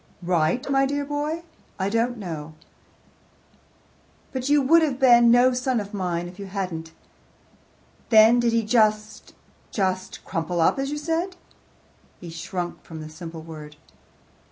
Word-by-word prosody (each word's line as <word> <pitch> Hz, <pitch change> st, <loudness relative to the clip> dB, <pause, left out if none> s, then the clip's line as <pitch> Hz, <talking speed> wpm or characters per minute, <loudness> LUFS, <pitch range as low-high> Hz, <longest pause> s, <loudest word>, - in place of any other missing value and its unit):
"Right, 175 Hz, -, +1 dB
my 270 Hz, 0 st, +2 dB
dear 285 Hz, +1 st, -2 dB
boy? 295 Hz, +3 st, -3 dB, 0.3 s
I 190 Hz, 0 st, -1 dB
don't 230 Hz, +3 st, 0 dB
know. 160 Hz, -6 st, -7 dB, 1.8 s
But 260 Hz, 0 st, -3 dB
you 295 Hz, 0 st, +5 dB
would 330 Hz, +5 st, +5 dB
have 290 Hz, -5 st, 0 dB
been 240 Hz, -3 st, +6 dB
no 245 Hz, +2 st, +5 dB
son 250 Hz, -1 st, 0 dB
of 205 Hz, 0 st, -7 dB
mine 175 Hz, -3 st, -2 dB
if 180 Hz, +3 st, -12 dB
you 200 Hz, -, -6 dB
hadn't. 180 Hz, -5 st, -4 dB, 1.2 s
Then 225 Hz, +1 st, +7 dB
did 240 Hz, -1 st, +2 dB
he 230 Hz, 0 st, +1 dB
just 215 Hz, -1 st, +1 dB, 0.3 s
just 185 Hz, -2 st, -2 dB
crumple 170 Hz, +1 st, -2 dB
up 165 Hz, -, +3 dB
as 275 Hz, 0 st, -1 dB
you 295 Hz, -, -3 dB
said?" 330 Hz, +5 st, -2 dB, 0.8 s
He 170 Hz, -2 st, -9 dB
shrunk 175 Hz, +2 st, -5 dB
from 160 Hz, -1 st, -9 dB
the 155 Hz, 0 st, -8 dB
simple 165 Hz, 0 st, -9 dB
word. 155 Hz, -2 st, -10 dB
215 Hz, 145 wpm, -24 LUFS, 175-260 Hz, 1.8 s, Then